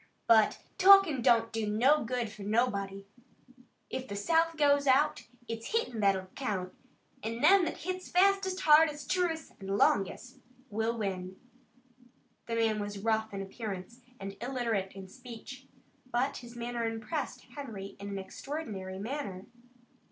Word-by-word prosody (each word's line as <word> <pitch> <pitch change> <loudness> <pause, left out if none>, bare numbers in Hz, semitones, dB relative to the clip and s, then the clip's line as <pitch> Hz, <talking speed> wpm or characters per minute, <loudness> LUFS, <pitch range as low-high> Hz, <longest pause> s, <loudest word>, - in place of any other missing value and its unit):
But 220 -2 +4 0.2
talkin' 385 -8 +7
don't 230 -1 +3
do 225 -1 -1
no 255 +9 +3
good 235 -1 -2
fur 215 -1 -12
nobody. 200 -2 0 0.9
If 260 0 -4
the 200 - -5
South 325 +9 +2
goes 285 -1 +3
out, 295 +3 +3 0.2
it's 230 - -5
hittin' 350 - 0
that'll 195 -2 +2
count, 195 -8 -3 0.5
an' 230 +2 -4
them 375 +4 +6
that 330 - -3
hits 370 +1 -5
fastest, 385 0 +3
hardest, 300 -1 +4
truest 345 -4 0
an' 195 - -7
longest 205 +7 +1 0.3
will 225 +2 -1
win." 190 -3 -4 1.1
The 230 - -2
man 225 -2 +1
was 205 0 -4
rough 220 +1 0
in 195 -1 -4
appearance 205 +2 -7 0.2
and 195 0 -6
illiterate 235 -6 -2
in 195 -1 -9
speech, 250 +4 -11 0.4
but 255 +4 0
his 240 -1 -11
manner 240 0 -3
impressed 250 +4 -4
Harry 215 -9 -7
in 200 0 -6
an 200 - -4
extraordinary 195 -3 -6
manner. 205 -4 -5
230 Hz, 140 wpm, -31 LUFS, 200-285 Hz, 1.1 s, talkin